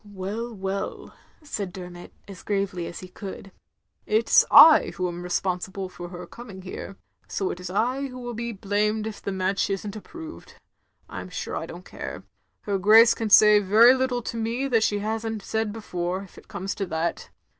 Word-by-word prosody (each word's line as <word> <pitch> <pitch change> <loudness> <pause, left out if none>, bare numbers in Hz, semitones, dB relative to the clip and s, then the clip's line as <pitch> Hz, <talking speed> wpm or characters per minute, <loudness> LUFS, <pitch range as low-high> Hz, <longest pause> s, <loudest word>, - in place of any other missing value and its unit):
"Well, 205 +4 -5
well," 195 -1 -5 0.3
said 205 -10 -4
Dermot, 180 -1 -10 0.2
as 195 -3 -10
gravely 195 -4 -2
as - - -8
he 185 - -9
could. 195 +1 -9 0.3
" - - -48
It 230 - -2
's - - +7
I 320 -1 +8
who 185 -1 -1
am 175 0 -6
responsible 185 +1 -2
for 175 -1 -9
her 180 0 -8
coming 210 -6 -11
here; 195 +1 -8 0.3
so 195 - -2
it 175 - -7
is 180 -1 -6
I 250 +8 0
who 255 -1 -10
will 245 -1 -6
be 235 +1 -4
blamed 210 +1 -1
if 220 -2 -6
the 200 - -3
match 190 +1 0
isn't 200 +1 -3
approved. 320 - -10 0.5
I'm - - -7
stire - - -5
I - - -3
don't - - -10
care. - - -7 0.4
Her 200 -2 -2
Grace 220 +4 +7
can 225 -2 -3
say 210 0 +8
very 215 +5 +6
little 260 -2 -1
to 230 - -5
me 230 +4 -1
that 230 -3 +3
she 205 -1 +1
has 220 +2 -2
n't 220 -2 -4
said 220 -1 -1
before, 185 -3 -4
if 195 - -16
it - - -15
comes 190 +2 -4
to 195 - -4
that. 165 0 -3
205 Hz, 195 wpm, -25 LUFS, 185-225 Hz, 0.5 s, I